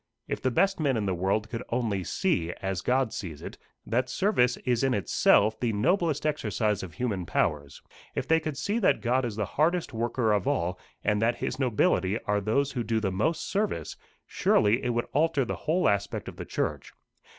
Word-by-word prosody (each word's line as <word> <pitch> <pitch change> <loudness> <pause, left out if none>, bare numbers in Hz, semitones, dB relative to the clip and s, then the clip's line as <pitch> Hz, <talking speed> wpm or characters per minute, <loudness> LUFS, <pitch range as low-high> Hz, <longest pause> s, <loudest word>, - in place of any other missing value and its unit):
if - - -3
the 130 - +1
best 195 +10 +2
men 140 -6 +1
in 105 - -1
the 95 - 0
world 95 +4 0
could 115 0 -5
only 115 -6 -1
see, 90 - 0
as 95 -2 -2
God 125 0 +1
sees 80 -7 -6
it, - - -8 0.3
that 120 +3 0
service 130 - +2
is 125 -1 +1
in 135 -2 +2
itself 105 +3 +3
the 120 -3 0
noblest 160 - +1
exercise 110 -8 0
of 85 -5 -8
human 105 -7 -2
powers, 75 -4 -1 0.3
if - - -2
they 160 0 +4
could 155 -3 -5
see 210 +3 -1
that 205 - +3
God 125 +2 +1
is 115 -4 -4
the 105 -1 -1
hardest 165 - 0
worker 115 -1 0
of 100 -3 0
all, 90 +2 0 0.2
and 105 0 +1
that 115 +1 +2
his 130 - -4
nobility 110 -5 +2
are 105 0 0
those 135 +7 +1
who 125 - -2
do 110 0 0
the 100 -3 -1
most 155 - -1
service, 200 - -2 0.3
surely 110 +4 +2
it - - 0
would 120 0 0
alter 150 -2 +2
the - - -3
whole 175 +4 +3
aspect 100 0 -1
of - - -8
the - - -6
church. - - -3
115 Hz, 200 wpm, -27 LUFS, 100-140 Hz, 0.3 s, they